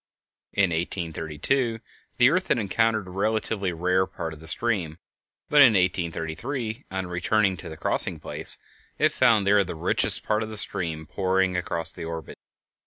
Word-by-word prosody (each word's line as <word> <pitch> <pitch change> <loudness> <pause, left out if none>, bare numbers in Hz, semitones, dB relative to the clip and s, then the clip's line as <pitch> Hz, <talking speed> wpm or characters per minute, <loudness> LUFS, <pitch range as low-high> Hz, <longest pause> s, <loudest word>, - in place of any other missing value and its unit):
In 100 -3 +2
1832 85 - -2 0.4
the 125 +2 +5
earth 185 +3 0
had - - +2
encountered 110 0 0
a 90 - -11
relatively 100 0 -1
rare 90 +2 0
part 80 -1 -6
of 75 - -12
the 80 - -8
stream, 90 -5 +2 0.5
but 150 - +5
in 125 -5 +8
1833, 95 - -2
on 95 0 -4
returning 95 +3 +1
to - - -9
the 80 - -9
crossing - - +3
place, - - -1 0.4
it - - +3
found 110 -4 +3
there 100 0 +4
the 90 - -7
richest 80 - +1
part 105 0 0
of 110 - -4
the 110 - -4
stream 85 -6 +1
pouring 95 +2 0
across 85 -2 -1
its - - -7
orbit. 80 0 -7
95 Hz, 165 wpm, -25 LUFS, 85-110 Hz, 0.5 s, in